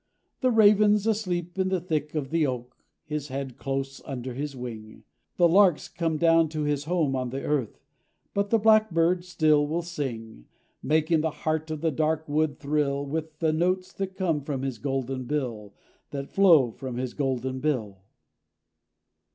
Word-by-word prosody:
The 255 - +2
raven's 210 -2 +5
asleep 185 -5 -1
in 190 0 +2
the 185 -1 +1
thick 155 -3 -3
of 140 -2 -3
the 160 -2 +2
oak, 125 -1 -5 0.3
His 150 -2 -4
head 135 -2 -5
close 135 0 -4
under 130 -1 -5
his 140 +2 -4
wing; 110 -4 -8 0.3
The 175 - +6
lark's 180 -2 +4
come 165 -2 -2
down 165 0 +4
to 155 -1 -3
his 145 -1 -1
home 160 -5 +1
on 130 -1 -2
the 135 +2 -5
earth— 140 -7 -2 0.5
But 200 0 0
the 230 - +4
blackbird 190 -6 +3
still 155 -4 +2
will 165 +3 -2
sing, 120 - -6 0.3
Making 155 +2 +2
the 160 - 0
heart 155 +1 -2
of 155 -1 -4
the 165 -1 +1
dark 155 +2 0
wood 150 0 0
thrill 140 -1 0
With 155 +2 -4
the 155 0 +1
notes 185 +3 0
that 190 -1 -4
come 170 -6 0
from 135 -2 -4
his 130 -5 -3
golden 135 0 -3
bill, 120 -8 -3 0.3
That 140 -1 -6
flow 165 -11 +5
from 130 0 -6
his 125 -1 -3
golden 130 -2 -2
bill. 115 -10 -2
150 Hz, 165 wpm, -26 LUFS, 135-170 Hz, 0.5 s, The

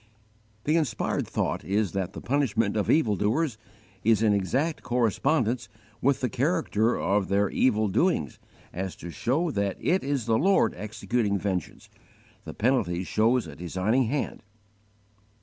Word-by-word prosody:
The 155 +3 +2
inspired 130 -9 -1
thought - - -2
is 100 -1 0
that 95 0 -3
the - - -7
punishment 115 -6 0
of 105 - 0
evil 115 -10 +3
doers 115 +5 0 0.4
is 110 0 +3
in 110 - +4
such 100 - +3
exact 135 - -1
correspondence 120 0 0 0.3
with 140 +1 +2
the 130 - +1
character 125 - 0
of 100 -1 +1
their 100 0 +1
evil 110 -4 +2
doings 100 - 0 0.3
as 95 +1 -4
to 85 - -8
show 130 - 0
that 100 -4 -1
it 185 +3 +1
is 140 -4 -1
the 115 -1 +2
Lord 195 +5 +3
executing 105 +1 -1
vengeance 95 -4 -4 0.6
the - - -7
penalty 105 -8 +1
shows 115 +6 +2
a 80 -3 -9
designing 95 - 0
hand. 135 +5 -2
110 Hz, 150 wpm, -27 LUFS, 100-135 Hz, 0.6 s, in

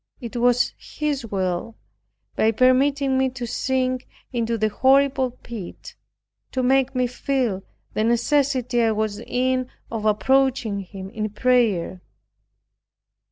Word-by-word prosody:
It 240 -1 -8
was 245 0 +2
His 290 -5 -3
will 190 +2 -2 0.6
by 220 - +3
permitting 265 +3 +3
me 265 0 +2
to 250 -1 -6
sink 255 +1 -1 0.3
into 230 -1 0
the 215 0 +1
horrible 265 +2 +3
pit, 235 -5 -9 0.6
to 260 - 0
make 265 +1 +2
me 250 0 +2
feel 245 -5 -1 0.3
the 215 - 0
necessity 250 +1 +1
I 225 -1 +3
was 215 -1 -2
in 255 +2 -1 0.2
of 220 -2 -3
approaching 240 -1 +2
Him 195 0 -8
in 215 -1 -3
prayer. 210 -6 +1
245 Hz, 120 wpm, -23 LUFS, 220-260 Hz, 0.6 s, by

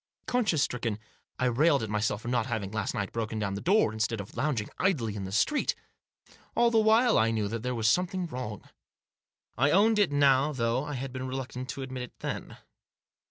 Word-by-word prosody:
Conscience 215 - +1
stricken, 115 -4 -2 0.4
I 130 - 0
railed 140 +3 +3
at 110 - -4
myself 105 0 -1
for - - -7
not 120 0 0
having, 110 -5 -3
last 110 -2 -2
night, 100 -1 -2
broken 115 -1 -3
down 100 -2 -1
the 100 - -4
door, 190 - +3
instead 110 0 -1
of 100 - -8
lounging 120 -4 -1
idly 130 - +1
in 100 -2 -4
the 95 - -6
street. 295 - +1 0.8
All 235 0 +4
the 225 - +4
while, 220 +2 +4
I 110 - +3
knew 110 -2 0
that 115 +1 -4
there 125 +1 -2
was 110 -1 0
something 180 +7 +1
wrong. 125 - -6 1.0
I 140 +3 +4
owned 210 +6 +4
it 200 -7 +3
now, 140 0 +4
though 120 0 0
I 150 0 -5
had 130 0 -5
been 130 0 -4
reluctant 130 0 -5
to 135 - -4
admit 130 -1 -6
it 125 - -7
then. - - -5
125 Hz, 205 wpm, -29 LUFS, 110-150 Hz, 1.0 s, All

